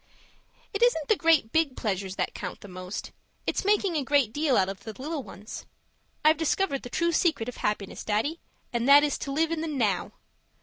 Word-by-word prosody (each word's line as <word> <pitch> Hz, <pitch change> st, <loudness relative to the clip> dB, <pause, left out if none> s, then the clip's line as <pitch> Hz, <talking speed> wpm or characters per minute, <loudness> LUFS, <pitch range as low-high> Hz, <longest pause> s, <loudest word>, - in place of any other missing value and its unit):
It 405 Hz, -, -3 dB
isn't 325 Hz, -12 st, +3 dB
the 435 Hz, -, +6 dB
great 325 Hz, -, +3 dB
big 320 Hz, -5 st, +1 dB
pleasures 195 Hz, -3 st, -2 dB
that -, -, -2 dB
count 180 Hz, -3 st, -6 dB
the -, -, -10 dB
most; 185 Hz, +1 st, -6 dB, 0.3 s
it's -, -, -1 dB
making 400 Hz, -3 st, +2 dB
a 295 Hz, -, +1 dB
great 270 Hz, -5 st, +2 dB
deal 290 Hz, -2 st, +2 dB
out 190 Hz, -, +3 dB
of 195 Hz, -1 st, -5 dB
the 220 Hz, -, -6 dB
little 300 Hz, +2 st, -3 dB
ones 210 Hz, -2 st, -9 dB, 0.6 s
I've 310 Hz, 0 st, +6 dB
discovered 320 Hz, -2 st, 0 dB
the 245 Hz, -, -8 dB
true 340 Hz, +6 st, +1 dB
secret 320 Hz, -8 st, +1 dB
of 250 Hz, -, -6 dB
happiness, 210 Hz, -2 st, -2 dB
Daddy, 225 Hz, +11 st, 0 dB, 0.3 s
and 235 Hz, +2 st, 0 dB
that 285 Hz, +1 st, +9 dB
is 295 Hz, -, 0 dB
to 275 Hz, -, -4 dB
live 320 Hz, +3 st, +1 dB
in 330 Hz, -1 st, -1 dB
the 325 Hz, -, -2 dB
now. 235 Hz, -, 0 dB
280 Hz, 205 wpm, -27 LUFS, 215-325 Hz, 0.6 s, that